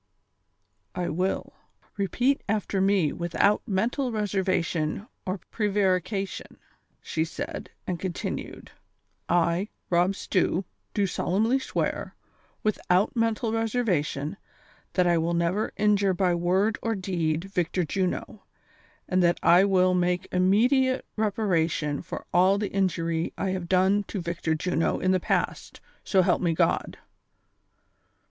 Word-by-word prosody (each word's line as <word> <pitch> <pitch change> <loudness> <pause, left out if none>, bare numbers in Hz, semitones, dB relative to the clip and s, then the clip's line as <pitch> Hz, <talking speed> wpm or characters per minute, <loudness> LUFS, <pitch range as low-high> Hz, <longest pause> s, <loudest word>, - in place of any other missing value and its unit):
" - - -48 0.3
I 180 -1 -1
will. 185 +4 -2 0.4
Repeat 245 +8 +1
after 205 -2 0
me 190 -6 +2
without 175 +4 +1
mental 235 +6 0
reservation 190 -5 -1 0.2
or 185 +2 -1
prevarication, 195 -2 -1 0.5
"she 160 - -1
said; 165 - -6 0.2
and 180 -2 -3
continued, 185 -3 -5 0.6
"1, 170 +3 +2 0.2
Rob 180 +3 +3
Stew, 185 -1 0 0.3
do 205 - +2
solemnly 215 +7 +1
swear, - - -3 0.5
without 205 0 +1
mental 230 0 0
reservation, 200 - -1 0.6
that 180 - +3
I 175 -1 +3
will 170 +1 0
never 170 +5 0
injure 205 -2 +3
by 180 -1 +2
word 185 +5 +1
or 225 -1 -1
deed 170 -4 -1
Victor 180 -2 -1
Juno, 190 +5 -3 0.6
and 185 0 +2
that 175 0 +3
I 175 +3 +6
will 185 -2 +3
make 180 +1 0
immediate 245 +8 +3
reparation 175 -9 0
for - - -7
all 185 +3 +5
the 205 0 -2
injury 170 -4 0
I 190 - -1
have 185 -2 -4
done 190 +2 +3
to 200 - -5
Victor 170 -2 -2
Juno 165 +1 0
in 185 - +1
the 185 - +3
past, - - -2 0.2
so 190 -2 +3
help 180 -1 +2
me 170 -3 +1
God." - - +1
185 Hz, 125 wpm, -26 LUFS, 175-205 Hz, 0.6 s, I